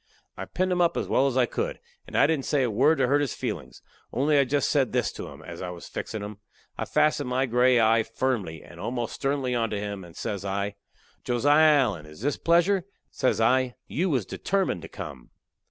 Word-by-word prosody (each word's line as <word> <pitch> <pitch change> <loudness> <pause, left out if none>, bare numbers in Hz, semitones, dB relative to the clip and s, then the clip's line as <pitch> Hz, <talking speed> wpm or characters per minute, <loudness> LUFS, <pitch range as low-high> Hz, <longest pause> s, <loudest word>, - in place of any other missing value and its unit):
I - - -6
pinned 185 0 -1
'em 180 0 +2
up 170 - +2
as - - -1
well 135 - +3
as 130 -1 -1
I 125 - +5
could, - - -3 0.3
and - - -4
I - - +6
didn't 145 -3 0
say 145 -3 +2
a 120 - 0
word 140 +9 +4
to 135 - +3
hurt 145 +3 +3
his 140 -5 -2
feelin's, - - -5 0.3
only 145 +4 +2
I 140 - +4
jest 140 +2 +1
said 135 -4 +2
this - - +1
to - - -7
him, - - -11
as 85 - -8
I 90 - -4
was 90 -1 -9
fixin' 110 -2 -5
'em 105 0 -7 0.4
I - - -3
fastened 150 -3 +1
my 130 +1 +1
gray 125 0 +4
eye 115 0 +4
firmly, 115 -8 -2
and 85 - -14
almost 120 +3 -3
sternly 135 -2 -1
onto 115 -3 0
him, 100 -1 -4
and 85 0 -13
says 100 -2 -3
I: 100 +1 -2 0.5
"Josiah 145 +5 +5
Allen, 95 - -2
is 75 +5 -13
this 145 +3 0
pleasure?" 175 +3 +2 0.2
Says 130 - 0
I, 125 +2 +2
"You 185 +5 -1
was 130 - 0
determined 190 - -1
to - - -8
come." - - -9
125 Hz, 220 wpm, -26 LUFS, 105-145 Hz, 0.5 s, I